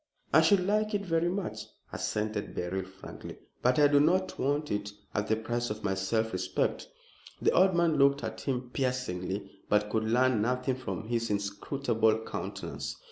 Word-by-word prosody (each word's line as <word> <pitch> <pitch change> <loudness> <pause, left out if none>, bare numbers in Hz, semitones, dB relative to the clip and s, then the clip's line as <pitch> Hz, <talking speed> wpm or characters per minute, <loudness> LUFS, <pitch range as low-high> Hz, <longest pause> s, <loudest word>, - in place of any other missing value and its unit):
"I 160 - +8
should 180 +3 +4
like 215 +1 +1
it 200 0 -2
very 165 -1 +1
much," 190 +1 -4 0.3
assented 105 -1 -2
Beryl, 95 +2 -2
frankly; 95 0 -10 0.2
"but 125 +1 +3
I 145 -1 +7
do 145 0 +5
not 185 +5 +2
want 145 +2 0
it 105 0 -2 0.2
at 105 +1 -1
the 110 - +3
price 120 +2 -2
of 110 +1 -5
my 95 -2 +1
self 110 +3 0
respect." 95 0 -1 0.5
The - - +3
old 185 0 +4
man 170 -2 +3
looked 140 -1 +4
at 110 0 -5
him 125 -2 -3
piercingly, 100 -7 -2 0.2
but 105 0 +2
could 110 0 +1
learn 125 0 +3
nothing 125 +3 0
from 120 -3 -5
his 115 -1 -1
inscrutable 110 +2 0
countenance. - - -5
120 Hz, 170 wpm, -30 LUFS, 105-145 Hz, 0.5 s, I